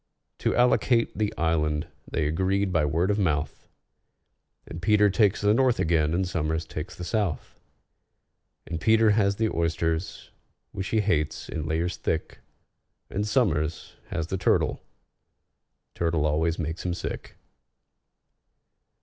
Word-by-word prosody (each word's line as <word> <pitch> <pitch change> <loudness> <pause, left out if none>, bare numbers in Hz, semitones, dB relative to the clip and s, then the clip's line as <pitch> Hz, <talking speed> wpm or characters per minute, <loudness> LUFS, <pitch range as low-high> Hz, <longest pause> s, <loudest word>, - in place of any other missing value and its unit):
To - - 0
allocate 120 -1 +3
the 105 -1 0
island 75 -1 0 0.2
they 80 - -1
agreed 95 +5 0
by 80 -3 +3
word 85 +7 +1
of 105 - 0
mouth, 80 -5 -1 1.0
And 85 - -8
PETER 105 0 +4
takes 100 -1 +2
the 105 0 +4
north 125 0 +3
again, 80 -1 +2
and 95 +1 0
SOMERS 80 -2 -1
takes 80 0 -6
the 90 - -7
south; 100 - -2 1.1
And 80 -1 -5
PETER 110 +1 +4
has 100 -1 +2
the 110 +1 -1
oysters, 80 0 -2 0.4
which 95 0 -4
he 110 +2 +2
hates, 80 -7 -1
in 80 -1 -4
layers 85 +3 -1
thick, 80 - -3 0.7
And 105 +2 -1
SOMERS 85 - 0
has 80 -2 -3
the 95 +3 -3
turtle—turtle 85 -3 -3
always 80 +2 +1
makes 80 0 -4
him 90 -1 -1
sick. - - -6
85 Hz, 130 wpm, -26 LUFS, 80-105 Hz, 1.1 s, PETER